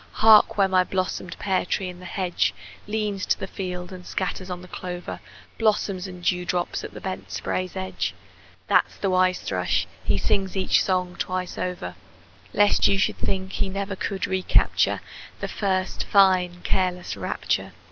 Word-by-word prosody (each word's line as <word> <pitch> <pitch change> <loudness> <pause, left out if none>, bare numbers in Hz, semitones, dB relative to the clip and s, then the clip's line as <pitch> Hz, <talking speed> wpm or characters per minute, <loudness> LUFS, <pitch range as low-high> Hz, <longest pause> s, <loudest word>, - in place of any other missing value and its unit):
Hark, 215 -1 +6
where 195 -1 +5
my 185 -1 +4
blossomed 185 -1 -2
pear 190 -2 +1
tree 190 +1 -1
in 180 -1 -8
the 180 - -11
hedge 180 -1 0 0.3
Leans 210 -2 -1
to - - +2
the - - -3
field 180 -2 -5
and 180 -1 -9
scatters 185 0 -3
on 180 0 -5
the - - -10
clover 180 -1 -6 0.4
Blossoms 205 -4 +1
and 180 -1 -9
dewdrops 180 0 0
at - - -8
the - - -6
bent 190 -1 -5
spray's 185 0 -2
edge 190 0 -2 0.5
That's - - +3
the 195 - 0
wise 185 0 +3
thrush; 90 -2 0 0.2
he - - +1
sings 190 - 0
each 185 - +3
song 180 -2 0
twice 185 0 -2
over, 180 - -3 0.6
Lest 205 0 +4
you 200 - +3
should 200 - +1
think 190 0 -1
he 195 - -1
never 195 +1 -3
could 190 0 -2
recapture 190 -1 +2 0.4
The - - -2
first 190 -2 -1
fine 185 -3 +4
careless 180 -1 0
rapture! - - -2
185 Hz, 165 wpm, -25 LUFS, 180-195 Hz, 0.6 s, Hark